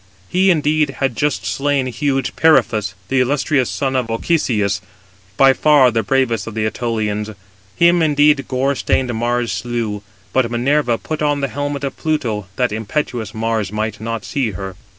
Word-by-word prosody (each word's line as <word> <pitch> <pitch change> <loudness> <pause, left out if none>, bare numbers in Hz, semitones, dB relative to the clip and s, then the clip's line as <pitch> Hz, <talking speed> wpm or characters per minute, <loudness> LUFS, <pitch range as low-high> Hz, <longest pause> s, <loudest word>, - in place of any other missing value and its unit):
He, 190 +2 +3
indeed, 150 -4 +2
had 135 -4 -1
just 140 -11 -1
slain 135 +8 0
huge 135 +1 -1
Periphas, 110 -11 +3
the 135 - +2
illustrious 135 0 +1
son 135 -1 -2
of 125 -3 0
Ochesius, 115 - 0 0.6
by 135 0 +6
far 145 -3 +4
the 115 0 +1
bravest 120 -4 0
of 115 - -7
the 110 -1 0
Ætolians. 110 -2 -2 0.4
Him 170 0 +4
indeed 150 -2 +3
gore 135 +2 0
stained 130 -2 0
Mars 120 0 -1
slew; 110 0 -3 0.3
but 130 -3 +2
Minerva 120 +1 +1
put 155 +5 -5
on 145 -1 +1
the 140 - -1
helmet 145 0 -3
of 140 - -4
Pluto 115 -11 -2
that 125 -2 0
impetuous 110 0 -3
Mars 110 -3 -1
might 110 0 -3
not 115 -1 -4
see 135 -6 -1
her. 95 +1 -6
125 Hz, 160 wpm, -18 LUFS, 110-145 Hz, 0.6 s, by